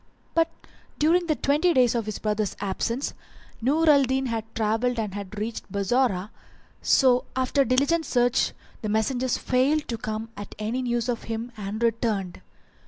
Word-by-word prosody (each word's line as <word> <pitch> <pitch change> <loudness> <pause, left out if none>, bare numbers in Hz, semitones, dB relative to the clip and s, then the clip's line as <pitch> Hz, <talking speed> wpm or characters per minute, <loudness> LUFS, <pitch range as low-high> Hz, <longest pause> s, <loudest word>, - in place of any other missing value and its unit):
But 330 0 +3 0.5
during 340 +3 +3
the 310 - +2
twenty 305 +6 +2
days 250 -3 +5
of 230 -3 -2
his 215 - -3
brother's 210 -1 -1
absence 220 +6 -2 0.5
Nur 300 +7 +2
al 290 -2 +7
Din 265 0 +1
had 225 -3 -2
travelled 225 +3 +1
far 225 - -1
and 200 - -8
had 205 0 -7
reached 220 +2 -5
Bassorah; 200 -1 +1 0.5
so 250 -2 +4
after 260 +2 +2
diligent 280 +7 +2
search 245 0 +2 0.3
the 215 - -3
messengers 245 +4 +1
failed 280 +4 +1
to 230 -2 -3
come 220 +1 -4
at 205 0 -8
any 220 +4 -2
news 240 -1 -1
of 240 -2 -2
him 230 +2 -4
and 210 +2 -4
returned. 220 -5 0
240 Hz, 165 wpm, -25 LUFS, 215-265 Hz, 0.5 s, al